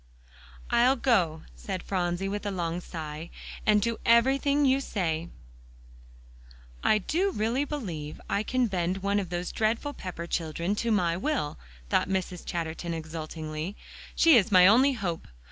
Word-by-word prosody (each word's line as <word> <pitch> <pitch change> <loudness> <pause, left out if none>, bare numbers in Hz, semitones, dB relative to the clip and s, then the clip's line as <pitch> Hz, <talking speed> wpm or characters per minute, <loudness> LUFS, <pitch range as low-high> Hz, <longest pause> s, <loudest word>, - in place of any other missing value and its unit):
"I'll 245 +3 +5
go," 185 - +1
said 190 -3 -5
Phronsie 180 0 -1
with 205 +1 -3
a - - 0
long 175 -3 -2
sigh, 160 -1 -7 0.4
"and 210 -1 +5
do 230 0 -1
every 235 +4 +5
thing 285 +1 +2
you 265 0 +4
say." 170 -8 -2 1.5
"I 215 - +4
do 340 - 0
really 240 - 0
believe 175 - -5
I 200 - 0
can 255 +3 +1
bend 185 -2 -1
one 200 +1 +2
of 190 -4 -4
those 175 0 -3
dreadful 225 +6 0
Pepper 180 -7 -6
children 170 +2 -2
to 235 - -1
my 175 -5 +2
will," 205 - -2 0.3
thought - - +2
Mrs. 185 -2 -2
Chatterton 165 0 -3
exultingly. 160 +2 -5 0.4
"She 330 -3 +6
is 220 0 +2
my 180 -2 +8
only 255 +8 +6
hope. 185 -9 -4
190 Hz, 150 wpm, -28 LUFS, 170-235 Hz, 1.5 s, my